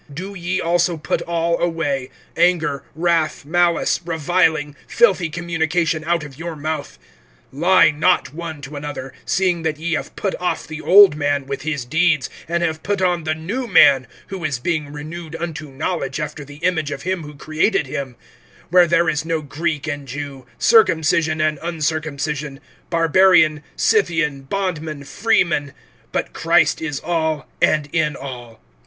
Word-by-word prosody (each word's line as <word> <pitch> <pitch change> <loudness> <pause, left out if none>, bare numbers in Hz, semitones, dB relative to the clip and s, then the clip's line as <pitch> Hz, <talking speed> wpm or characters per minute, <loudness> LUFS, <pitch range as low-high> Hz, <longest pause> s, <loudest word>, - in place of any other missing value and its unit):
(8)But - - -34
now, 145 - -14
do 190 +5 -6
ye 185 0 -2
also 175 0 +1
put 155 - -2
all 170 0 0
away, 145 -6 -1 0.3
anger, 165 -5 +2
wrath, 165 -3 0
malice, 175 +2 +2
reviling, 160 -2 +1
filthy 195 - +3
communication 165 -1 -1
out 170 -1 +1
of 145 -1 -11
your 170 -1 -5
mouth. 150 - -4 0.6
(9)Lie 165 +1 +4
not 155 -4 +2
one 160 -2 -6
to 140 +2 -8
another, 145 -3 -6
seeing 180 -3 +1
that 160 -2 -2
ye 165 +2 -2
have 155 - -3
put 195 - -2
off 180 - -1
the 155 0 -7
old 195 -4 +7
man 145 -2 0
with 140 0 -5
his 150 -4 -3
deeds, 160 +1 +1 0.2
(10)and 170 0 0
have 160 -2 -1
put 200 0 -1
on 175 -3 +1
the 155 0 0
new 205 +11 -4
man, 140 - +6 0.2
who 190 -3 -6
is 150 -4 -1
being 150 +2 -2
renewed 160 +2 -7
unto 160 -3 -5
knowledge 135 -1 -3
after 150 0 -5
the 145 +1 -12
image 165 -4 +1
of 140 -2 -6
him 185 -1 -1
who 150 -1 -10
created 155 +4 0
him; 130 -1 -5 0.6
(11)where 180 -2 +6
there 170 +1 +3
is 150 -1 0
no 160 -1 -2
Greek 155 +1 -3
and 145 -3 -4
Jew, 135 -1 -7
circumcision 160 - +3
and 155 -1 +1
uncircumcision, 150 -3 -3 0.3
Barbarian, 165 -2 +4
Scythian, 165 -9 +1
bondman, 160 -7 -3
freeman; 170 -5 +1 0.4
but - - -2
Christ 165 +1 +2
is 150 -3 -3
all, 160 -3 -1
and 150 -2 +3
in 155 -3 +1
all. 120 -5 -9
160 Hz, 160 wpm, -20 LUFS, 145-170 Hz, 0.6 s, old